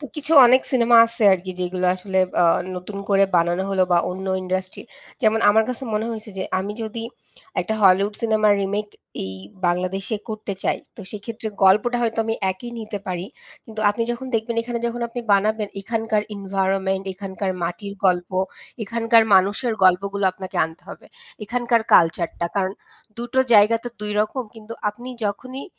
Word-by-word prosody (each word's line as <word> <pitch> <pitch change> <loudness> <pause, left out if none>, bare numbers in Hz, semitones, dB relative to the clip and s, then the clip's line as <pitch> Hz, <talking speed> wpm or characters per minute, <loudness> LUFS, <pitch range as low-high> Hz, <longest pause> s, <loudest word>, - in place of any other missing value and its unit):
তো 295 - -7
কিছু 300 +2 0
অনেক 255 +2 +5
সিনেমা 235 -2 +5
আছে 230 0 -6
আরকি 185 0 -1
যেগুলো 180 0 -1
আসলে 190 0 -2 0.2
আ - - +4 0.3
নতুন 180 +3 -7
করে 195 -1 +4
বানানো 175 +2 +1
হলো 190 -1 +2
বা 175 - +5
অন্য 190 +1 -6 0.2
industry 185 0 -3 0.4
যেমন 220 0 +3
আমার 220 +1 +5
কাছে 250 0 -4
মনে 215 +1 -1
হইছে 220 -1 -6
যে - - -1 0.2
আমি 200 +2 -4
যদি 225 +1 -4 0.6
একটা 220 - -2
Hollywood 195 +2 +4
সিনেমার 215 -2 +3
remake 205 +2 -3 0.3
এই 95 0 -5 0.3
বাংলাদেশে 185 +4 -1
করতে 215 -2 -5
চাই - - +1 0.2
তো - - -9
সেক্ষেত্রে 220 +1 -5 0.2
গল্পটা 210 +6 +4
হয়তো 225 -1 -1
আমি 225 0 -1 0.2
একই 190 +6 -7
নিতে 215 -2 -5
পারি। 180 -1 -3 0.4
কিন্তু 220 -2 -7
আপনি 210 +3 -2
যখন 240 +2 -7
দেখবেন 225 +1 -1
এখানে 235 0 -4
যখন 235 +1 -4
আপনি 245 +1 -5
বানাবেন, 210 +1 +2
এখানকার 220 +1 -1
environment 195 -1 -1
এখানকার 190 0 -4
মাটির 200 +4 -4
গল্প, 180 -1 +1 0.5
এখানকার 230 +1 +3
মানুষের 200 +6 +2
গল্পগুলো 195 +2 +2
আপনাকে 185 0 -8
আনতে 160 +1 -10
হবে, - - -11 0.4
এখানকার 240 +1 +1
culture 170 0 +4
টা. 170 - +1
কারণ 190 -1 0 0.5
দুটো 240 +2 -2 0.2
জায়গা 210 +2 +6
তো - - -2
দুই 210 0 -2
রকম। 215 +5 -1
কিন্তু 225 0 -10 0.2
আপনি 240 +5 -8 0.2
যখনই 255 +6 -4
205 Hz, 165 wpm, -22 LUFS, 190-230 Hz, 0.6 s, জায়গা